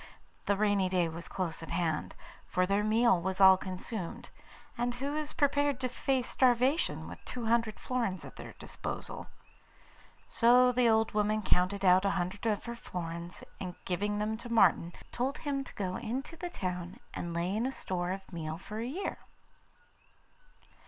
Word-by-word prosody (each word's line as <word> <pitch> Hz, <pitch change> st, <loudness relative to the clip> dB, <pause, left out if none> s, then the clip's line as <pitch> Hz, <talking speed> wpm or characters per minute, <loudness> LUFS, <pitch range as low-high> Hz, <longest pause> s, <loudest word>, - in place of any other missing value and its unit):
the 200 Hz, -, +4 dB
rainy 205 Hz, -2 st, +2 dB
day 180 Hz, -2 st, +2 dB
was 165 Hz, +2 st, -6 dB
close 175 Hz, -4 st, -3 dB
at 165 Hz, -, -8 dB
hand, 165 Hz, -3 st, -1 dB, 0.3 s
for 185 Hz, -, +2 dB
their 200 Hz, +2 st, +1 dB
meal 220 Hz, -3 st, +4 dB
was 190 Hz, +1 st, -2 dB
all 190 Hz, -1 st, +9 dB
consumed, 185 Hz, +1 st, -5 dB, 0.4 s
and 240 Hz, 0 st, -1 dB
who 280 Hz, +4 st, -3 dB
is 305 Hz, -1 st, -3 dB
prepared 285 Hz, -2 st, +2 dB
to 255 Hz, -, 0 dB
face 255 Hz, 0 st, 0 dB
starvation 255 Hz, +5 st, +2 dB
with -, -, -10 dB
two 245 Hz, -2 st, -5 dB
hundred 230 Hz, -1 st, +1 dB
florins 230 Hz, -8 st, -2 dB
at -, -, -11 dB
their -, -, -9 dB
disposal? -, -, -6 dB, 1.0 s
So 250 Hz, +2 st, +5 dB
the 245 Hz, -1 st, +4 dB
old 220 Hz, 0 st, +3 dB
woman 210 Hz, 0 st, +1 dB
counted 195 Hz, +2 st, +2 dB
out 185 Hz, +1 st, +6 dB
a 200 Hz, -, +3 dB
hundred 185 Hz, +5 st, -2 dB
of 210 Hz, -2 st, 0 dB
her 235 Hz, 0 st, -4 dB
florins, 170 Hz, -4 st, -6 dB, 0.2 s
and 180 Hz, -2 st, -5 dB
giving 205 Hz, +3 st, -1 dB
them 215 Hz, +1 st, -1 dB
to 235 Hz, +1 st, -9 dB
Martin, 175 Hz, -6 st, +4 dB, 0.2 s
told 265 Hz, +4 st, -1 dB
him 280 Hz, -2 st, -2 dB
to -, -, -12 dB
go 185 Hz, -2 st, -2 dB
into 255 Hz, +7 st, -4 dB
the 350 Hz, +2 st, -5 dB
town 180 Hz, -, -4 dB
and 170 Hz, -, -4 dB
lay 170 Hz, +3 st, -1 dB
in 230 Hz, +4 st, +1 dB
a -, -, -2 dB
store 180 Hz, -8 st, -3 dB
of 190 Hz, 0 st, -5 dB
meal 160 Hz, -1 st, -4 dB
for 210 Hz, +4 st, -7 dB
a 230 Hz, -, -2 dB
year. 355 Hz, +10 st, -3 dB
210 Hz, 170 wpm, -31 LUFS, 185-245 Hz, 1.0 s, all